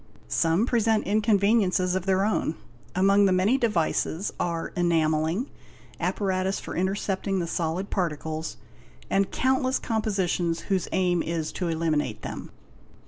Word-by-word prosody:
Some 165 +7 +2
present 225 -3 +2
inconveniences 200 -3 +2
of 185 0 -2
their 190 +1 +3
own. 210 -6 0 0.4
Among 195 +2 +4
the 195 - +3
many 195 +9 +3
devices 190 -4 0
are 170 -2 -2
enarelling, 165 - +1 0.5
apparatus 190 -1 0
for - - -7
intercepting 195 +1 -1
the 175 - 0
solid 170 +3 -2
particles, 160 -3 -3 0.5
and 195 0 +2
countless 260 0 +1
compositions 190 -7 -1
whose 190 -3 -1
aim 180 -2 +2
is 165 -2 -2
to 180 - -3
eliminate 155 -8 -1
them. - - -6
185 Hz, 125 wpm, -26 LUFS, 165-205 Hz, 0.5 s, Among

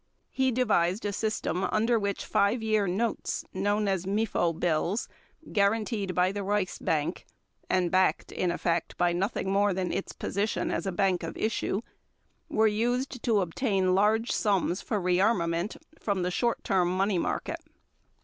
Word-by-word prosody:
He 260 -1 +1
devised 210 -6 +1
a 205 - -1
system 215 -3 -1
under 225 +2 +2
which 200 -1 -2
5 210 +4 +1
year 215 -2 +2
notes, 215 +6 -1
known 205 +2 0
as 190 -2 -1
Mefo 200 -4 +1
bills, 170 +5 0 0.4
guaranteed 205 -1 +1
by 180 +1 +3
the 205 - -4
Reichsbank 185 -5 -1 0.5
and 180 -2 +1
backed, 185 0 +2
in 180 - -1
effect, 170 -1 -1
by 175 -1 +2
nothing 195 +1 -1
more 200 -1 +2
than 185 -2 -1
its - - -3
position 205 +3 -2
as - - -2
a - - 0
bank 190 0 +1
of 165 - -6
issue, 220 -1 -1 0.7
were 220 - +3
used 245 +4 0
to 220 -4 +2
obtain 190 0 +1
large 215 +4 +2
sums 195 -3 +1
for 215 - -2
rearmament 180 0 +1 0.2
from 200 -4 -1
the 180 - -1
short 235 +5 0
term 185 -3 +2
money 195 -1 +2
market. - - -2
200 Hz, 150 wpm, -28 LUFS, 180-215 Hz, 0.7 s, by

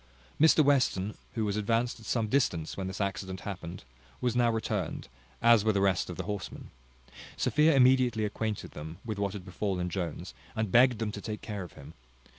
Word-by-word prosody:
Mr 155 0 +6
Western, 110 -8 +2 0.2
who 110 -2 0
was 100 -1 -1
advanced 115 +3 0
at 110 - -12
some 115 -3 0
distance 105 - 0
when 95 -1 -4
this 95 - -5
accident 95 -2 -3
happened, 90 -5 -6 0.4
was 120 +4 0
now 120 -1 +4
returned, 115 -1 -2 0.4
as 115 -3 +6
were 110 - +3
the 100 - +1
rest 95 -3 +1
of 90 - -6
the - - -3
horsemen. 105 -3 -6 0.7
Sophia 150 +1 +3
immediately 125 -4 +4
acquainted 105 0 -3
them 80 +2 -8
with 110 -3 -4
what 100 -1 -1
had 100 -3 -7
befallen 90 -1 -2
Jones, 85 -4 -4 0.2
and 110 -3 -1
begged 125 +1 +6
them 110 -1 -2
to 100 - -7
take 105 0 -5
care 105 -3 -4
of 90 - -9
him. 70 +3 -12
105 Hz, 190 wpm, -30 LUFS, 95-115 Hz, 0.7 s, Mr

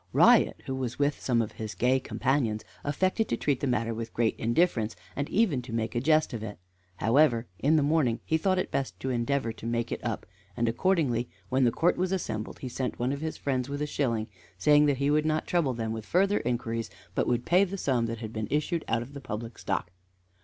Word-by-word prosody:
Riot, - - +5
who 135 - -3
was 130 -2 -3
with 145 0 +1
some 120 -3 +1
of 110 - -6
his 110 -1 -6
gay 130 +2 +3
companions, 125 -5 0 0.2
affected 185 +9 0
to 115 - 0
treat 140 -1 0
the 140 - -1
matter 115 -2 0
with 115 0 -6
great 115 -1 +2
indifference, 115 -2 +1 0.2
and 140 +2 -2
even 190 - +2
to 120 -1 -10
make 115 -1 -2
a 120 - 0
jest 155 0 +3
of 115 - -4
it. 105 -2 -6 0.4
However, 120 +2 +3
in 150 +4 +3
the 150 - +4
morning 145 -6 +2
he 160 - +1
thought 185 +2 +2
it 185 - -1
best 135 - -2
to 130 - -1
endeavor 120 0 0
to 115 - -11
make 115 0 -1
it - - -4
up, - - -3 0.3
and 120 - +1
accordingly, 120 -2 +1 0.2
when 130 0 +3
the 120 - +4
court 170 +8 +2
was 185 0 0
assembled, 110 - -3
he 130 - -4
sent 125 +1 -3
one 125 +2 0
of 140 - -5
his 160 0 -3
friends 130 -2 -1
with 145 0 -3
a 150 - 0
shilling, 115 -7 -1 0.3
saying 150 +9 +5
that 140 -2 +2
he 140 +2 +1
would 150 +1 +3
not 155 0 0
trouble 155 -8 +1
them 115 -1 -2
with 110 -1 -5
further 195 - +2
inquiries, 115 -2 -2 0.2
but - - 0
would 120 0 0
pay 180 +3 +5
the 195 0 -3
sum 125 -9 +1
that 115 0 -3
had 110 -1 -7
been 110 -1 -3
issued 155 +3 0
out 115 - +1
of 135 +4 -13
the 140 - -7
public 115 -2 -6
stock. 85 - -2
130 Hz, 230 wpm, -28 LUFS, 115-150 Hz, 0.4 s, Riot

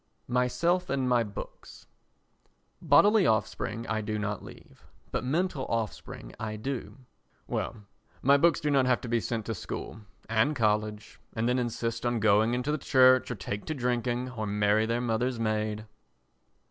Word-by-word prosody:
Myself 170 +9 +1
and 135 -2 0
My 120 -2 +3
Books 105 -2 -10 1.0
Bodily 190 +6 +5
offspring 110 +1 -1
I 110 -1 -1
do 105 0 -3
not 105 -1 -3
leave, - - -14 0.3
but - - -2
mental 150 +1 -1
offspring 110 - -4
I 110 -1 -4
do. 130 +4 -5 0.5
Well, 105 -3 -4 0.4
my 140 +2 +6
books 165 +3 +4
do 150 - -1
not 135 -2 +3
have 125 -1 +3
to - - -6
be 120 0 +1
sent 115 -1 -3
to 115 - -2
school 110 +2 -6 0.3
and 115 +7 +2
college 105 -2 -1
and 110 +1 -1
then 125 +1 +2
insist 115 -1 -2
on 120 -1 0
going 110 +2 +3
into 125 +4 -1
the 150 - -1
Church 130 -2 +5
or 125 - -3
take 100 +1 -5
to 155 - -3
drinking 125 0 -1
or 110 -4 -4
marry 105 +1 +2
their 115 +1 0
mother's 120 +1 -1
maid. 110 -1 -1
120 Hz, 160 wpm, -28 LUFS, 110-130 Hz, 1.0 s, my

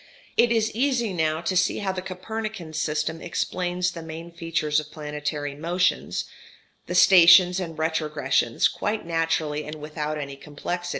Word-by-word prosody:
It 235 - +4
is 225 -1 +2
easy 240 -3 0
now 160 -2 0
to 185 - -1
see 185 +1 +2
how 200 -2 -1
the 185 -1 -4
Copernican 190 -2 -6
system 155 +1 -2
explains 180 0 -1
the 170 - -8
main 165 +1 -8
features 165 -3 0
of 150 0 -8
planetary 150 -1 -4
motion, 175 +5 0 0.8
the 180 - -3
stations 180 0 +7
and 165 -4 -5
retrogressions, 150 -6 +1
quite 210 -2 -3
naturally 165 -2 0
and 150 +1 -7
without 150 0 -4
any 140 -2 -6
complexity. 175 +5 -5
165 Hz, 145 wpm, -25 LUFS, 150-180 Hz, 0.8 s, stations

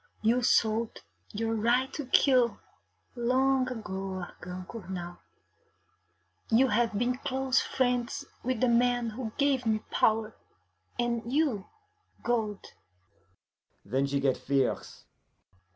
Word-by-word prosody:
You 235 +3 +3
sold 225 -1 +2 0.3
your 225 +2 -1
right 240 +4 +1
to 290 -4 -5
kill 255 -3 +4 0.6
long 255 +2 +2
ago, 190 -5 -4
Argand 180 +1 -9
Cournal. 180 -5 -7 1.3
You 250 +4 +4
have 225 -1 +1
been 250 +3 0
close 265 0 +1
friends 255 +2 -1 0.2
with 255 -2 -1
the 255 - +4
man 240 -1 +2
who 225 0 -5
gave 280 -3 +2
me 215 -1 +2
power, 220 0 +2 0.6
and 235 -1 -1
you 270 -9 +1 0.6
gold.' 220 -4 -2 1.1
Then 135 +7 0
she 140 0 0
get 135 -2 +2
fierce. 135 -2 -1
235 Hz, 110 wpm, -29 LUFS, 210-255 Hz, 1.3 s, kill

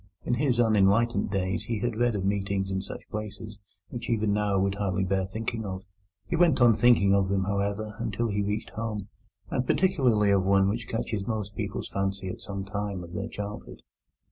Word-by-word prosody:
In - - 0
his 125 -1 +1
unenlightened 110 0 +3
days 95 0 -1
he 115 - -2
had 120 -1 -1
read 120 0 +1
of 95 -2 -2
meetings 100 -1 0
in 95 0 -1
such - - -9
places 105 0 -6 0.3
which 120 - -6
even 110 -3 +1
now 105 -1 +1
would 95 0 +1
hardly 95 -2 -1
bear 95 0 0
thinking 110 +3 -3
of. 95 -2 -5 0.4
He 170 - -2
went 170 -3 +4
on 120 -2 +7
thinking 110 -3 +5
of 100 -1 +2
them, 95 -1 +1
however, 100 +2 -1
until 115 0 -1
he 105 0 0
reached 105 +2 -2
home, 105 -3 -4 0.4
and 125 - -1
particularly 125 - +3
of 100 -1 +3
one 95 0 +4
which 115 +2 -3
catches 110 -3 -3
most 105 -3 -3
people's - - -3
fancy 95 -1 -2
at - - -7
some 100 -1 -5
time 100 -2 -3
of 85 0 -10
their 100 +5 -3
childhood. 105 -1 -7
105 Hz, 195 wpm, -27 LUFS, 95-115 Hz, 0.4 s, on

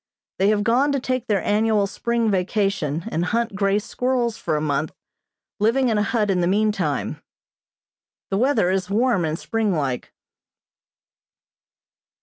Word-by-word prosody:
They 195 - +3
have 210 -1 +2
gone 250 +6 +2
to 275 - +1
take 255 -1 -2
their 200 -4 +1
annual 210 0 +2
spring 230 +2 -1
vacation 185 -5 0
and 165 - 0
hunt 230 +2 -1
grey 200 0 +2
squirrels 240 +1 -1
for 155 - -2
a - - +1
month, 150 0 -1 0.7
living 240 +5 +2
in 215 -2 +1
a - - +2
hut 210 -1 +1
in 180 -2 +1
the 175 - +1
meantime. 210 +3 0 1.1
The 195 - +1
weather 255 -8 +2
is 190 -1 -1
warm 215 -3 +2
and 155 0 -2
springlike. 165 - -2
210 Hz, 140 wpm, -22 LUFS, 185-235 Hz, 1.1 s, They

